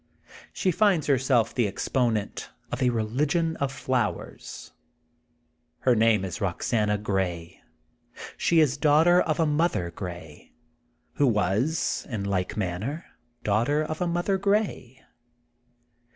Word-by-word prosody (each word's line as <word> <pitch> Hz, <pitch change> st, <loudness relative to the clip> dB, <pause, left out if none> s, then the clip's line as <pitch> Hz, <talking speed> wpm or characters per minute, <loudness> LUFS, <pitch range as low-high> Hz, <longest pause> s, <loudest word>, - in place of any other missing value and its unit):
She 185 Hz, -, 0 dB
finds 190 Hz, -3 st, +2 dB
herself 130 Hz, -4 st, +2 dB
the 120 Hz, -4 st, +1 dB
exponent 110 Hz, +1 st, -1 dB, 0.2 s
of 125 Hz, -, -3 dB
a 125 Hz, -, +4 dB
religion 145 Hz, +9 st, 0 dB
of 140 Hz, -1 st, -1 dB
flowers. 130 Hz, -4 st, -3 dB, 1.1 s
Her 125 Hz, -2 st, +3 dB
name 110 Hz, -3 st, +3 dB
is 95 Hz, +5 st, -5 dB
Boxana 105 Hz, +2 st, 0 dB
Grey. 95 Hz, -5 st, -3 dB, 0.7 s
She 170 Hz, -, +2 dB
is 145 Hz, -2 st, +2 dB
daughter 160 Hz, +4 st, +5 dB
of 155 Hz, -1 st, -1 dB
a 165 Hz, -, +3 dB
Mother 150 Hz, -, 0 dB
Grey,'' 85 Hz, -4 st, -9 dB, 0.6 s
who 145 Hz, -, +4 dB
was 110 Hz, -, 0 dB
in 110 Hz, -5 st, -3 dB
like 95 Hz, -1 st, -2 dB
manner 105 Hz, -, -3 dB, 0.4 s
daughter 120 Hz, +9 st, +1 dB
of 155 Hz, +1 st, -5 dB
a 180 Hz, -, +1 dB
Mother 175 Hz, +3 st, 0 dB
Grey.'' 200 Hz, -, -1 dB
125 Hz, 120 wpm, -26 LUFS, 105-155 Hz, 1.1 s, daughter